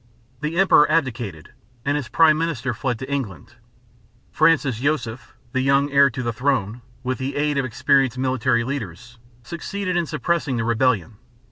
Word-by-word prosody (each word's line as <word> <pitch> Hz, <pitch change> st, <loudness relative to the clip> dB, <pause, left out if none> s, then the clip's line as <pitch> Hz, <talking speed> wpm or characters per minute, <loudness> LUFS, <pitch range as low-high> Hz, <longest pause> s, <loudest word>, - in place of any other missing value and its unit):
The 155 Hz, +4 st, -3 dB
emperor 185 Hz, -6 st, +5 dB
abdicated 120 Hz, -, -2 dB, 0.3 s
and 145 Hz, +1 st, +1 dB
his 145 Hz, -5 st, -3 dB
prime 160 Hz, -2 st, +5 dB
minister 150 Hz, -6 st, -2 dB
fled 125 Hz, +1 st, -2 dB
to 130 Hz, -, -7 dB
England. 120 Hz, -5 st, -4 dB, 0.8 s
Francis 155 Hz, -7 st, +2 dB
Joseph, 125 Hz, -4 st, -2 dB, 0.2 s
the 130 Hz, 0 st, 0 dB
young 140 Hz, +2 st, +2 dB
heir 140 Hz, 0 st, +5 dB
to 125 Hz, +1 st, -5 dB
the 120 Hz, -1 st, -2 dB
throne, 120 Hz, -3 st, -1 dB, 0.2 s
with 130 Hz, +1 st, -2 dB
the 135 Hz, +1 st, -3 dB
aid 145 Hz, -1 st, 0 dB
of 135 Hz, -, 0 dB
experienced 130 Hz, +1 st, +1 dB
military 130 Hz, -2 st, +1 dB
leaders 120 Hz, -2 st, -6 dB, 0.2 s
succeeded 180 Hz, -, -4 dB
in 175 Hz, -2 st, 0 dB
suppressing 155 Hz, -2 st, -1 dB
the 115 Hz, -, -1 dB
rebellion. 115 Hz, -3 st, 0 dB
130 Hz, 155 wpm, -22 LUFS, 120-150 Hz, 0.8 s, emperor